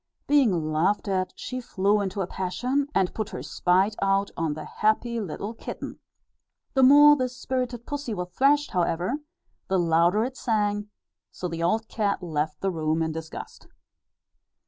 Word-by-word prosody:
Being 205 Hz, -, +2 dB
laughed 180 Hz, +8 st, +1 dB
at 185 Hz, -1 st, 0 dB
she 255 Hz, 0 st, -5 dB
flew 205 Hz, -2 st, +1 dB
into 195 Hz, 0 st, -2 dB
a -, -, 0 dB
passion, 245 Hz, +11 st, -1 dB
and 190 Hz, -2 st, +2 dB
put 215 Hz, -1 st, -3 dB
her -, -, -6 dB
spite 180 Hz, +8 st, +2 dB
out 195 Hz, 0 st, +2 dB
on 160 Hz, -3 st, -1 dB
the 155 Hz, -, -7 dB
happy 230 Hz, +2 st, 0 dB
little 205 Hz, +2 st, -5 dB
kitten. -, -, -7 dB, 0.7 s
The 265 Hz, -, +3 dB
more 290 Hz, +3 st, +8 dB
this 255 Hz, -2 st, -3 dB
spirited 250 Hz, -2 st, -3 dB
pussy 285 Hz, -6 st, -4 dB
was 180 Hz, -1 st, -4 dB
thrashed 285 Hz, +8 st, +3 dB
however, 180 Hz, -, 0 dB, 0.5 s
the 190 Hz, -, +1 dB
louder 170 Hz, +4 st, +3 dB
it 260 Hz, +1 st, -5 dB
sang; 210 Hz, -3 st, 0 dB, 0.4 s
so 180 Hz, -, -5 dB
the 165 Hz, -1 st, -5 dB
old 220 Hz, +7 st, +1 dB
cat 205 Hz, -4 st, -1 dB
left 155 Hz, -2 st, -2 dB
the 195 Hz, -, 0 dB
room 160 Hz, -1 st, 0 dB
in 160 Hz, -, -1 dB
disgust. 160 Hz, 0 st, -8 dB
200 Hz, 160 wpm, -26 LUFS, 175-240 Hz, 0.7 s, more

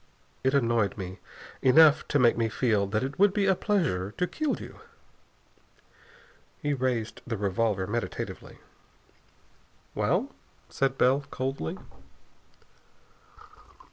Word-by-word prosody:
It 130 Hz, +2 st, +2 dB
annoyed 115 Hz, -6 st, +1 dB
me 95 Hz, -1 st, -7 dB, 0.4 s
enough 150 Hz, +3 st, +6 dB
to 145 Hz, -, +1 dB
make 120 Hz, -4 st, +4 dB
me 115 Hz, -1 st, 0 dB
feel 110 Hz, -3 st, +1 dB
that 110 Hz, +4 st, -1 dB
it 135 Hz, +4 st, -5 dB
would 200 Hz, -1 st, +4 dB
be 205 Hz, -2 st, +2 dB
a 190 Hz, -, +4 dB
pleasure 165 Hz, -, -1 dB
to 180 Hz, -, +1 dB
kill 305 Hz, -, -2 dB
you." -, -, -11 dB, 1.8 s
He 145 Hz, 0 st, -1 dB
raised 125 Hz, -4 st, -2 dB
the 115 Hz, -2 st, -2 dB
revolver 100 Hz, 0 st, 0 dB
meditatively. 115 Hz, +4 st, -5 dB, 1.4 s
"Well?" -, -, 0 dB, 0.4 s
said 135 Hz, -1 st, -1 dB
Bell 135 Hz, +3 st, +3 dB
coldly. 130 Hz, -12 st, -3 dB
125 Hz, 110 wpm, -27 LUFS, 110-145 Hz, 1.8 s, enough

